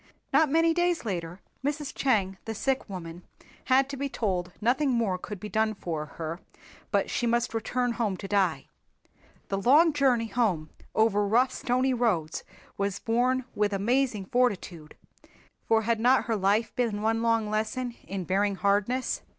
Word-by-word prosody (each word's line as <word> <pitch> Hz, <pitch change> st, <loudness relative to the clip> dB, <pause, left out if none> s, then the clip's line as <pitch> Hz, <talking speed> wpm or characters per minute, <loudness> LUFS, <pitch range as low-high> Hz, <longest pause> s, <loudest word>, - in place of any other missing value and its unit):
Not 315 Hz, -2 st, +5 dB
many 330 Hz, +2 st, +3 dB
days 350 Hz, -4 st, 0 dB
later, 175 Hz, -3 st, -4 dB, 0.2 s
Mrs. 290 Hz, 0 st, -2 dB
Chang, 195 Hz, -8 st, 0 dB
the 225 Hz, -, -4 dB
sick 270 Hz, +1 st, -1 dB
woman, 175 Hz, -2 st, -7 dB, 0.4 s
had 265 Hz, 0 st, +4 dB
to 280 Hz, -, -5 dB
be 280 Hz, +1 st, -2 dB
told 185 Hz, -7 st, -2 dB
nothing 255 Hz, +6 st, +2 dB
more 225 Hz, -7 st, 0 dB
could 205 Hz, +1 st, -7 dB
be 210 Hz, -, -6 dB
done 220 Hz, 0 st, 0 dB
for 160 Hz, -5 st, -4 dB
her 165 Hz, +1 st, -4 dB, 0.5 s
but -, -, 0 dB
she 240 Hz, -, 0 dB
must 235 Hz, 0 st, +1 dB
return 245 Hz, +2 st, -1 dB
home 220 Hz, -5 st, -1 dB
to 195 Hz, -, -7 dB
die. 185 Hz, -9 st, +1 dB, 0.8 s
The 195 Hz, 0 st, -1 dB
long 300 Hz, -, +5 dB
journey 260 Hz, -5 st, +2 dB
home 195 Hz, -9 st, 0 dB, 0.2 s
over 205 Hz, -2 st, +3 dB
rough 245 Hz, +5 st, +3 dB
stony 255 Hz, +1 st, 0 dB
roads 200 Hz, -11 st, 0 dB, 0.4 s
was 200 Hz, 0 st, -1 dB
borne 245 Hz, +3 st, +1 dB
with 210 Hz, -1 st, 0 dB
amazing 225 Hz, +1 st, +1 dB
fortitude, 190 Hz, -9 st, -1 dB, 0.7 s
for 225 Hz, 0 st, +3 dB
had 230 Hz, 0 st, +1 dB
not 250 Hz, +3 st, +4 dB
her 230 Hz, -, 0 dB
life 205 Hz, +3 st, +1 dB
been 220 Hz, -4 st, -1 dB
one 225 Hz, +1 st, +1 dB
long 230 Hz, -2 st, +2 dB
lesson 220 Hz, +4 st, -2 dB
in 190 Hz, -1 st, -4 dB
bearing 200 Hz, +3 st, +1 dB
hardness. 205 Hz, +6 st, 0 dB
225 Hz, 160 wpm, -27 LUFS, 195-250 Hz, 0.8 s, Not